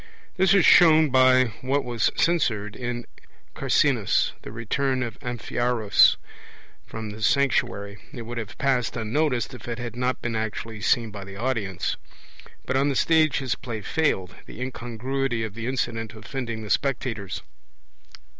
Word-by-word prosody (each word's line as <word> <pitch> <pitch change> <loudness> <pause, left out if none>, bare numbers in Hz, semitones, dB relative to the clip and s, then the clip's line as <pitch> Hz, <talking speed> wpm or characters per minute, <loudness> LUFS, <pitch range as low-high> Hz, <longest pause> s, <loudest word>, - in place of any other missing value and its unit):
This 190 0 +4
is 195 - +5
shown 160 -4 +7
by 130 -2 +5
what 135 +2 0
was 120 -2 +1
censured 110 -12 +1
in 120 -1 -4 0.5
Carcinus, - - +2
the - - -9
return 130 +4 -1
of 115 -2 -6
Amphiaraus 120 -3 +2 0.7
from 110 -2 -6
the 110 +1 -10
sanctuary; 110 -6 +1
it 120 - -7
would 120 +1 -5
have 110 -3 -7
passed 125 -3 0
unnoticed, 125 +3 0
if 120 -3 -10
it 120 -1 -3
had 120 -1 -6
not 125 +1 -1
been 120 -1 -3
actually 110 0 -4
seen 115 +1 +2
by 100 -1 -7
the 95 0 -10
audience; 100 -6 -2 0.7
but 130 - -1
on 140 +2 +3
the 140 - -1
stage 155 0 +3
his 130 -3 -1
play 115 -4 -6
failed, 95 - 0
the - - -10
incongruity 125 0 -3
of 110 -3 -5
the 115 +2 -5
incident 115 -4 -2
offending 115 +1 -5
the 105 - -5
spectators. 115 -8 -1
120 Hz, 150 wpm, -25 LUFS, 110-135 Hz, 0.7 s, shown